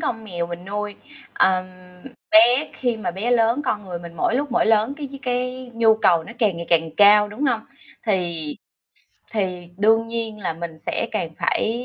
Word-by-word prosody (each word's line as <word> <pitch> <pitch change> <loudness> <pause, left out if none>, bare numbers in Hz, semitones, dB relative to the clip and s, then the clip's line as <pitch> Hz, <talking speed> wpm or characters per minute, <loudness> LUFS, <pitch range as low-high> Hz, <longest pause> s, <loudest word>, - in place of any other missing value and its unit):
con 225 -8 -3
mèo 175 -5 -3
mình 175 +1 -7
nuôi. 205 +1 -4 0.4
Ờm, 185 -1 +3 0.7
bé 310 -3 +5
khi 245 -3 0
mà 220 - -3
bé 200 +7 -3
lớn, 235 +3 +3
con 210 -5 -1
người 180 -2 -5
mình 170 0 -10
mỗi 195 - +1
lúc 280 0 -1
mỗi 235 - +2
lớn 220 +4 +3
cái 290 -2 -6
cái 250 0 -3
nhu 225 -1 +5
cầu 175 -7 +3
nó 235 - -10
càng 205 -6 +2
ngày 170 0 -6
càng 165 -1 +2
cao, 210 0 +7
đúng 215 +8 -4
hông? 240 -4 +1 0.5
Thì 170 -7 -2 0.8
thì 185 -5 -2
đương 225 +2 +3
nhiên 230 -2 -4
là 185 -5 -2
mình 165 -1 -7
sẽ - - -1
càng 170 -7 -2
phải 235 +3 0
215 Hz, 190 wpm, -22 LUFS, 180-235 Hz, 0.8 s, cao